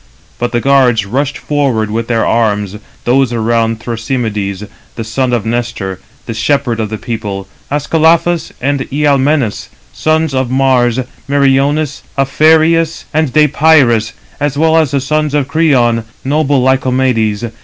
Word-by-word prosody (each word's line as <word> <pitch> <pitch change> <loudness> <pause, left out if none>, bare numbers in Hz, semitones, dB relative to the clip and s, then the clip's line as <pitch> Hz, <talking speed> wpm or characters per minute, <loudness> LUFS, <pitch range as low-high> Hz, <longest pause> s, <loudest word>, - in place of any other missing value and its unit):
But 120 - -1
the 120 - 0
guards 125 -6 +3
rushed 135 +7 -2
forth 130 -8 -1
with 115 +1 -2
their 115 -2 0
arms, 105 -3 0 0.3
[those 130 0 +2
around] 115 -1 0
Thrasymedes, 110 -4 -3 0.3
the 115 - -4
son 125 +3 -1
of 120 -4 -1
Nestor, 115 -5 -3 0.3
the 115 - -5
shepherd 120 +1 0
of 110 -2 -2
the 110 - -4
people, 105 -4 -5 0.2
Ascalaphus 160 +3 +1
and 140 +1 -1
Ialmenus, 140 - +1 0.2
sons 155 - 0
of 130 -2 -1
Mars, 130 -2 +2 0.3
Meriones, 140 +1 +1 0.2
Aphareus, 160 +4 +2
and 155 -3 +1
Deïpyrus, 140 -6 +3 0.3
as 145 -1 -1
well 160 +1 +3
as 160 -3 +3
the 140 - 0
son 155 +2 0
of 145 -3 0
Creon, 125 -8 +2 0.2
noble 145 -2 +1
Lycomedes. 125 -4 0
130 Hz, 135 wpm, -13 LUFS, 115-145 Hz, 0.3 s, guards